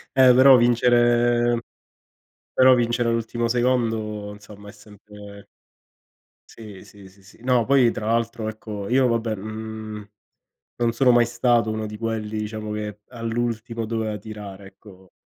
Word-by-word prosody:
Eh 130 -1 +6
però 130 +1 +7
vincere 120 0 +2 0.9
però 130 0 +6
vincere 120 0 0
all'ultimo 115 0 -1
secondo, 115 -4 -1
insomma, 105 0 -14
è - - -10
sempre 105 -1 -14 1.0
Sì, 105 -4 -12
sì, 100 -2 -16
sì, 95 +1 -21
sì. 95 - -19
No, 125 -2 +2
poi 130 -2 +4
tra 110 - -5
l'altro, 115 -1 -1
ecco 105 -2 -7
io 130 +1 +3
vabbè, 115 -2 -1
mhmm, 110 0 -8 0.7
non 120 -1 0
sono 125 +1 +3
mai 120 0 +4
stato 120 -1 +1
uno 110 0 -3
di 105 0 -7
quelli, 110 -1 -4
diciamo, 105 0 -5
che 105 -1 -6
all'ultimo 115 -1 -4
doveva 110 -1 -3
tirare, 100 -2 -10
ecco 95 -1 -18
110 Hz, 140 wpm, -22 LUFS, 105-120 Hz, 1.0 s, però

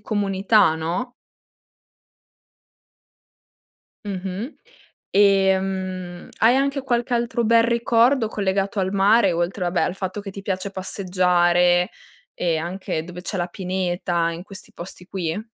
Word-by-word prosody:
comunità, 205 -3 +2
no? 175 +11 -3 2.9
Mh-mh. 195 - -5 0.6
E, 195 -1 +5
mhmm, 185 -2 -5
hai 235 +3 +5
anche 275 0 0
qualche 240 -1 -1
altro 235 0 0
bel 230 +1 +5
ricordo 235 +1 +3
collegato 195 -1 -1
al 190 0 -1
mare, 200 0 +4
oltre 175 +3 -2
vabbè 175 0 0
al 180 - -1
fatto 190 +1 -4
che 195 - -7
ti 195 - -8
piace 190 0 -3
passeggiare 180 -1 +2 0.4
e 170 -2 0
anche 170 -1 -4
dove 180 0 -9
c'è 195 - -4
la 175 -1 -1
pineta, 175 -2 -2
in 165 +1 -7
questi 195 +1 -12
posti 180 +1 -10
qui? 185 +1 -3
190 Hz, 125 wpm, -22 LUFS, 180-210 Hz, 2.9 s, E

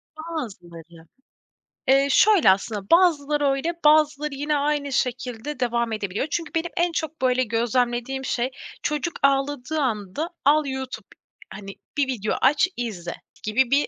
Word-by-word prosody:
Bazıları. 175 - -8 0.8
Eee, 275 +1 +5
şöyle 385 - +5
aslında, 200 +1 -2
bazıları 300 -5 +4
öyle, 275 +5 0
bazıları 300 -1 +3
yine 295 +2 -1
aynı 285 -1 -1
şekilde 250 +2 -2
devam 235 -2 0
edebiliyor. 210 +5 -2
Çünkü 335 -2 -2
benim 335 +1 -1
en 345 0 +2
çok 320 -2 -4
böyle 255 0 +2
gözlemlediğim 240 +3 -1
şey 245 +1 -1 0.3
çocuk 300 +3 -1
ağladığı 275 +1 +1
anda 230 - -2 0.2
al 300 +1 +4
YouTube, 265 -5 -5 0.5
hani 195 0 -9 0.2
bir 280 -2 +2
video 215 -5 -2
aç, 295 +7 +4
izle 190 -8 -4 0.3
gibi 235 +4 +1
bir 285 +1 +3
265 Hz, 135 wpm, -24 LUFS, 230-300 Hz, 0.8 s, Eee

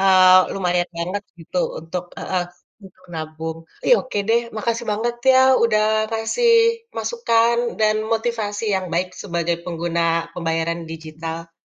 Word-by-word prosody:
eee, 185 -1 +7
lumayan 180 -2 0
banget 185 +4 -3 0.2
gitu 165 +2 -4 0.2
untuk 175 +2 -5
heeh, 185 -1 -2 0.4
untuk 185 -1 -17
nabung. 160 0 -5 0.2
Tapi, - - -1
oke 255 -5 -4
deh, 230 +1 +4 0.2
makasih 230 +2 -2
banget 235 +3 -2 0.2
ya, 260 - +6 0.2
udah 215 -2 +3 0.3
kasih 225 - +1 0.5
masukan 235 - +2 0.2
dan 215 0 +3 0.2
motivasi 225 -2 -2
yang 185 -1 -3
baik 180 +2 -1
sebagai 170 -2 -2
pengguna 165 -1 -1
pembayaran 165 0 -2
digital. 165 +1 -7
185 Hz, 130 wpm, -21 LUFS, 165-220 Hz, 0.5 s, eee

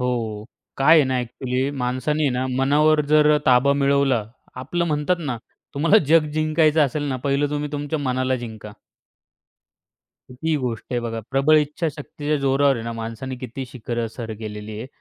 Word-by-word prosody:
हो. 115 -4 -2 0.3
काय 140 +4 +6
आहे 155 - +5
ना 130 - 0
अ‍ॅक्चुअली, 125 +2 -2
माणसाने 140 +5 0
ना 130 +1 -1
मनावर 150 +3 +4
जर 150 0 +5
ताबा 130 +2 +5
मिळवला 140 -5 +2 0.4
आपलं 170 +6 -1
म्हणतात 150 +3 0
ना, 140 -7 -3 0.4
तुम्हाला 165 +9 +4
जग 160 0 +4
जिंकायचं 155 0 +2
असेल 145 +2 -2
ना, 130 - -1
पहिलं 140 +2 0
तुम्ही 150 0 -3
तुमच्या 145 +2 -3
मनाला 130 -1 0
जिंका. 110 -3 -8 1.6
ही 160 +6 -2
गोष्ट 120 -5 -3
आहे 120 - 0
बघा, 115 -1 -4
प्रबळ 140 +3 +4
इच्छाशक्तीच्या 150 0 -2
जोरावर 140 0 +3
आहे 115 - -6
ना, 115 - -4
माणसाने 115 +3 -6
किती 130 +1 -6
शिखरं 120 -1 -4
सर 115 0 -7
केलेली 105 -1 -7
आहे. 115 - -6
135 Hz, 155 wpm, -22 LUFS, 120-150 Hz, 1.6 s, काय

